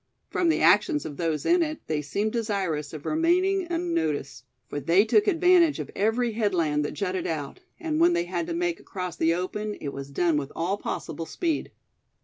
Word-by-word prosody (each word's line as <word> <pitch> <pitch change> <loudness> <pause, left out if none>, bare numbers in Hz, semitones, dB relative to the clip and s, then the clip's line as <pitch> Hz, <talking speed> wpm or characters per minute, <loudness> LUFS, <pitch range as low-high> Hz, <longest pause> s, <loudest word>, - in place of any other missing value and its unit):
From 345 - +1
the 320 - +2
actions 300 -5 +4
of 145 -2 -6
those 160 -3 -1
in 350 +1 +4
it, 310 -1 -1
they 155 -1 -1
seemed 200 +9 -2
desirous 195 -10 -2
of 155 -2 -9
remaining 360 +4 +2
unnoticed; 155 - -2 0.2
for 145 - -4
they 175 +7 +4
took 410 - +3
advantage 355 -3 +4
of - - -6
every 225 +4 +1
headland 175 -9 +1
that - - -5
jutted 185 -3 -2
out; 150 - -4 0.2
and 320 -2 -1
when 345 +1 +5
they 345 0 +1
had 335 - -3
to 345 - -3
make 350 0 -1
across 180 -3 -6
the 165 +1 +2
open, 210 +4 -3
it 145 - -4
was 140 0 -7
done 165 +2 +1
with 145 -1 -3
all 180 +5 -1
possible 165 -4 -5
speed. 330 -4 -2
210 Hz, 190 wpm, -26 LUFS, -, 0.2 s, when